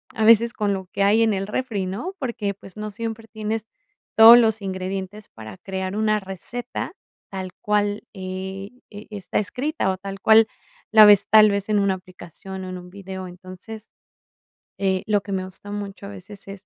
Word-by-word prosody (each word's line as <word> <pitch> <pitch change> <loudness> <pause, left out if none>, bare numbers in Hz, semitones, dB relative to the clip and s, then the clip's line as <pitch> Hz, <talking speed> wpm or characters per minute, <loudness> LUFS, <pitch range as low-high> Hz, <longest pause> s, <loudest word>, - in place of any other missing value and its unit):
a 220 - -1
veces 230 +2 +6
con 205 -2 -1
lo 190 -1 -4
que 195 - +1
hay 210 +3 +4
en 225 -1 +3
el 195 0 -2
refri, 210 -4 -2
¿no? 240 - -5
Porque, 230 - -3
pues, 195 0 -12
no 210 0 -5
siempre 225 +1 -6
tienes 220 0 -4 0.5
todos 225 +2 +11
los 220 -2 +3
ingredientes 190 +2 -5
para 110 +7 -11
crear 190 +1 -5
una 215 0 +2
receta 215 - -6 0.4
tal 190 -1 -6
cual, 205 0 0
eh, 190 0 -6 0.2
e 205 0 -11
e 210 - -7
está 185 -3 -2
escrita, 255 - -2
o 190 - -1
tal 195 +1 -7
cual 220 +2 +6 0.4
la 215 -1 +9
ves 205 -1 +6
tal 215 0 +7
vez 200 0 -2
en 210 -1 +3
una 200 -1 +2
aplicación 185 +1 -9
o - - -7
en 185 - -6
un 180 0 -11
video. 190 -1 -8
Entonces, 185 +5 -11 0.9
eh, 190 -1 0
lo 210 -1 +1
que 200 +1 -9
me 190 -1 -1
gusta 190 +2 -6
mucho 200 -1 -6
a - - -8
veces 200 +1 -11
es, 195 0 -10
200 Hz, 190 wpm, -23 LUFS, 190-215 Hz, 0.9 s, todos